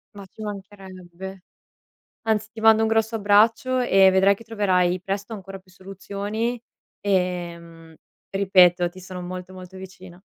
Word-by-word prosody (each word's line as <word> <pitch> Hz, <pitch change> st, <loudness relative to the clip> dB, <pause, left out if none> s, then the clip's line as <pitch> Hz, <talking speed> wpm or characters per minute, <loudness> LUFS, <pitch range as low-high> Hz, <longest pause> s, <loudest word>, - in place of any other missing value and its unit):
Ma 200 Hz, -1 st, -10 dB
ci 195 Hz, +3 st, -15 dB
mancherebbe. 190 Hz, -2 st, -9 dB, 0.8 s
Anzi, 220 Hz, -1 st, 0 dB
ti 225 Hz, -, -9 dB
mando 220 Hz, 0 st, +5 dB
un 220 Hz, -, +2 dB
grosso 225 Hz, 0 st, +1 dB
abbraccio 220 Hz, +5 st, +3 dB
e 195 Hz, -6 st, +5 dB
vedrai 190 Hz, +1 st, +4 dB
che 230 Hz, -, -15 dB
troverai 185 Hz, -5 st, +1 dB
presto 200 Hz, +4 st, -4 dB
ancora 195 Hz, -2 st, -8 dB
più 185 Hz, 0 st, -24 dB
soluzioni 200 Hz, +5 st, -5 dB, 0.4 s
e, 180 Hz, -3 st, -1 dB
mhmm, 165 Hz, -1 st, -15 dB, 0.4 s
ripeto, 180 Hz, -3 st, +4 dB
ti 185 Hz, +1 st, -13 dB
sono 185 Hz, 0 st, -8 dB
molto, 180 Hz, +1 st, -7 dB
molto 185 Hz, 0 st, -11 dB
vicina. 185 Hz, -1 st, -12 dB
195 Hz, 145 wpm, -23 LUFS, 185-210 Hz, 0.8 s, mando